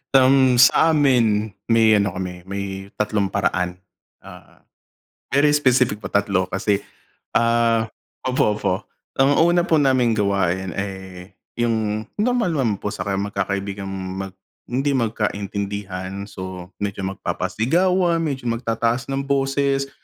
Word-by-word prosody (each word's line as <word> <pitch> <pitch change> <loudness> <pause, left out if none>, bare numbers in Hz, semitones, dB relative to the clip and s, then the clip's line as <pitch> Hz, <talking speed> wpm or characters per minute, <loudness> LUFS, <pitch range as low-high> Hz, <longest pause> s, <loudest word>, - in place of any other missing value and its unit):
Um, 130 -1 +5
sa 155 +6 +5
amin, 115 -7 +2 0.2
may 115 -1 +4
ano 100 -3 -1
kami 90 -1 -5
may 100 0 -5
tatlong 105 -1 0
paraan, 90 -1 -1 0.5
oo. - - -14 0.8
Very 145 +2 +4
specific 125 -6 +2
po, 95 - -6
3 100 -2 +1
kasi, 100 0 0 0.5
ah 115 -1 +2 0.3
opo, 125 -4 +1
opo. 95 -3 -2 0.3
Ang 135 +2 +4 0.2
una 175 0 +2
po 160 -4 +3
naming 130 -4 +3
gawain 95 -3 0
eh, 95 -1 -6 0.2
'yung 110 -2 0
normal 225 -5 +1
naman 115 -9 0
po 105 +1 -4
sa 90 - -4
magkakaibigang 100 0 -2
mag 95 0 -5 0.4
hindi 135 +3 0
magkaintindihan 100 -4 -3
so 95 -1 -8
medyo 100 -1 -3
magpapa-sigawan, 170 - 0
medyo 135 -6 -3
mag-tataas 115 +2 -1
ng 135 0 -2
boses, 135 0 0
110 Hz, 120 wpm, -21 LUFS, 100-135 Hz, 0.8 s, Um